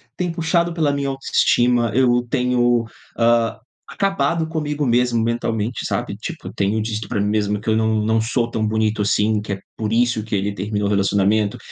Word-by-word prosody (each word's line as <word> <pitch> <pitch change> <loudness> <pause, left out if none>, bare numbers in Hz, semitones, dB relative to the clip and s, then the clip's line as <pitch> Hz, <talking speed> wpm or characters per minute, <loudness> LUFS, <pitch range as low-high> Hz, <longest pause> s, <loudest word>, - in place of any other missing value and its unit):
tem 180 -2 -2
puxado 170 +1 0
pela 155 -4 +1
minha 140 -1 -1
autoestima. 120 -3 +2
Eu 120 -1 +3
tenho, 120 -2 +2 0.3
ah, 115 -1 +2 0.3
acabado 185 -5 0
comigo 150 -2 -2
mesmo 120 -1 +2
mentalmente, 115 0 -2
sabe, - - -2
tipo, - - -7
tenho 105 +2 0
dito 110 -1 -4
pra - - -1
mim 100 - +1
mesmo 105 -1 0
que 110 - -4
eu 110 - +3
não 110 -1 +1
não 110 0 +2
sou 115 +1 0
tão 110 -2 -1
bonito 110 0 0
assim, 105 +1 +1
que 105 -1 -4
é 100 - -5 0.2
por 110 -1 -2
isso 120 -2 +2
que 105 - -8
ele 100 0 0
terminou 105 +1 -2
o - - -1
relacionamento, 100 +1 +1
115 Hz, 185 wpm, -20 LUFS, 105-125 Hz, 0.3 s, Eu